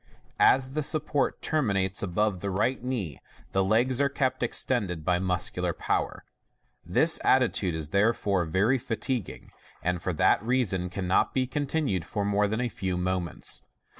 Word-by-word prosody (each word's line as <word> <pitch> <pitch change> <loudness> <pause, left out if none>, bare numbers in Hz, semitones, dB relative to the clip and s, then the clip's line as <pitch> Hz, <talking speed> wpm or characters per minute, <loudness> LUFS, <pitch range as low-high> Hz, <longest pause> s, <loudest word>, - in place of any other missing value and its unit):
As 130 0 +4
the 155 - 0
support 150 -2 0
terminates 100 -11 0
above 100 0 0
the 100 - -2
right 115 +7 0
knee, 115 - -3 0.3
the 95 - +2
legs 120 +6 +2
are 140 - +3
kept 130 -2 -1
extended 105 -9 -1
by 90 -1 +2
muscular 90 -1 -1
power. - - -2 0.6
This - - +2
attitude 90 -3 +2
is 80 -2 -4
therefore 100 -3 +2
very 100 +11 +2
fatiguing, 115 -1 -4 0.3
and 90 0 -1
for 95 - -1
that 80 - +3
reason 105 -7 0
cannot 90 0 0
be 130 -1 +2
continued 140 - -1
more 105 0 +2
than 110 +4 -1
a 125 - 0
few 95 -4 -3
moments. 90 -2 -3
100 Hz, 145 wpm, -27 LUFS, 90-130 Hz, 0.6 s, As